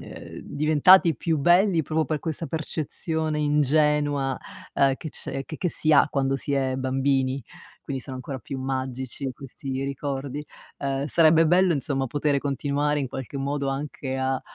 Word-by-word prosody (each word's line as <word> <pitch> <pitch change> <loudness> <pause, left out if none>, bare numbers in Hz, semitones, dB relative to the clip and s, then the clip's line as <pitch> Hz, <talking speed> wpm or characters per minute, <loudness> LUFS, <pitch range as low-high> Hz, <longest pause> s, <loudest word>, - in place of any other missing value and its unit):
ehm, - - -10
diventati 155 +4 +5
più 160 +5 0
belli 175 +3 +4
proprio 155 +2 0
per 155 -2 -2
questa 160 0 -4
percezione 160 0 -3
ingenua, 145 -2 +2 0.4
uhm, 135 -1 +4
che 160 - -7
c'è 135 - -5
che 155 - -7
che 180 - -1
si 155 -1 +1
ha 140 - +6
quando 135 -1 0
si 140 - -4
è 135 -2 0
bambini, 135 0 0 0.4
quindi 135 -1 -4
sono 130 +1 -6
ancora 130 +1 -6
più 135 +2 -6
magici 130 0 -3
questi 135 0 -6
ricordi. 140 +1 -4 0.3
Uhm, 140 0 -2
sarebbe 160 +1 +5
bello, 180 +1 +4
insomma, 135 -1 -1
potere 145 +2 +1
continuare 145 +1 0
in 135 - -2
qualche 135 +1 -6
modo 140 0 -2
anche 135 -1 -4
a 130 0 0
140 Hz, 155 wpm, -25 LUFS, 135-155 Hz, 0.4 s, ha